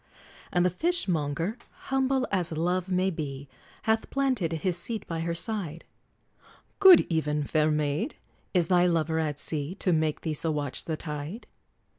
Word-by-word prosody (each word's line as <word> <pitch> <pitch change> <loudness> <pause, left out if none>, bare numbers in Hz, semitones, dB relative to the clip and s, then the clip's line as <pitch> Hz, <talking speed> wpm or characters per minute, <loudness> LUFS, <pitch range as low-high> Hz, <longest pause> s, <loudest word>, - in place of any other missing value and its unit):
And 175 0 +2
the 180 - +3
Fishmonger, 180 - 0 0.3
humble 265 -1 +1
as 180 -4 0
love 175 +3 -1
may 185 +1 +1
be 140 -4 -5 0.4
Hath 220 0 +1
planted 260 -11 0
his 170 +2 -1
seat 215 +6 -3
by 165 -1 -4
her 170 +1 -2
side; 170 -4 -2 0.9
"Good 380 -4 +9
even, 150 -3 0
fair 155 +2 +2
maid! 150 - -1 0.4
Is 175 -3 +2
thy 180 -1 +4
lover 160 -1 +1
at 150 -3 -1
sea, 150 +3 -2
To 185 -3 +1
make 155 -1 0
thee 160 - -2
so 160 +2 +2
watch 145 -4 -3
the 160 -2 -2
tide?" 150 +8 -6
170 Hz, 155 wpm, -27 LUFS, 155-190 Hz, 0.9 s, Good